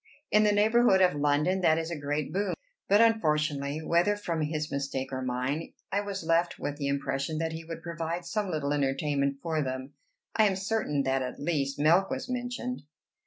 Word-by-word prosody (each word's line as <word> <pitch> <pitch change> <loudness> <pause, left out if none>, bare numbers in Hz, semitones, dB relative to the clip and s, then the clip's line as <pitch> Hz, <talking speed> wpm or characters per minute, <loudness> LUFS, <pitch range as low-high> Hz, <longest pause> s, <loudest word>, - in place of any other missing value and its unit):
In 210 - +5
the 210 - +4
neighborhood 215 0 +4
of 185 -1 +5
London, 150 +6 +1
that 160 -3 +4
is 165 +1 -3
a - - -2
great 145 0 -3
boon. 200 +2 0 0.3
But 205 +3 +6
unfortunately, 150 -9 +1
whether 175 +6 +3
from 170 -6 -3
his 150 0 -2
mistake 140 -1 -2
or 130 - -2
mine, 130 +5 -2 0.2
I 200 - +1
was 200 -3 -5
left 165 +1 +1
with 145 0 -4
the 140 -2 -2
impression 140 +2 -1
that 165 0 -1
he 160 0 -6
would 165 0 -8
provide 170 +1 -4
some 210 -1 -2
little 150 -4 -1
entertainment 140 0 0
for 160 -2 0
them; 130 0 -4 0.4
I 220 - +5
am 195 -2 +2
certain 190 -8 -1
that 135 0 +1
at 125 -1 -5
least 145 -3 -1
milk 170 +6 +4
was - - -3
mentioned. 250 0 -3
160 Hz, 190 wpm, -29 LUFS, 140-190 Hz, 0.4 s, But